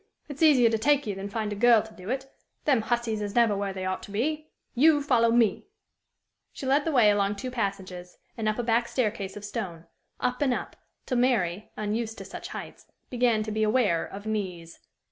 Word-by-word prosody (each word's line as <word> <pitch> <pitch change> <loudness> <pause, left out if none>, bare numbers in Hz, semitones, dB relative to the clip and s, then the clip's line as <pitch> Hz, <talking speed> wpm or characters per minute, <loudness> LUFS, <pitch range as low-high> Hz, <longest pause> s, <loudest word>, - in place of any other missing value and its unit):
It's 290 0 -9
easier 265 -8 +6
to 225 - 0
take 285 +4 +3
you 210 - -2
than 195 +1 -6
find 215 0 -3
a - - -5
girl 230 0 +5
to 220 0 -13
do 185 0 -10
it. 265 +1 -2 0.4
Them 265 -6 +3
hussies 225 -1 -1
is 205 -1 -4
never 230 -3 +4
where 200 0 -2
they 190 -1 -6
oughto 185 +2 -4
be! 305 +9 -2 0.2
You 290 +3 +4
follow 240 -5 +3
me." 230 - +2 0.8
She - - -8
led 275 +2 +2
the 325 - 0
way 235 -7 +5
along 205 0 +1
two 255 +5 -5
passages, 190 -6 -4 0.2
and 220 -2 -1
up 215 - -1
a 240 - -1
back 235 +1 +2
staircase 210 -5 -2
of 205 - -7
stone 185 -7 -5 0.3
up 250 +1 -1
and 260 -4 +2
up, - - -6 0.3
till 250 - 0
Mary, 210 -7 +1
unused 220 +2 -2
to - - -8
such - - -8
heights, - - -9 0.2
began 240 -3 +2
to 215 - -5
be 215 +1 -1
aware 215 -6 +2
of 200 +2 -9
knees. 185 -6 -4
220 Hz, 205 wpm, -27 LUFS, 200-250 Hz, 0.8 s, easier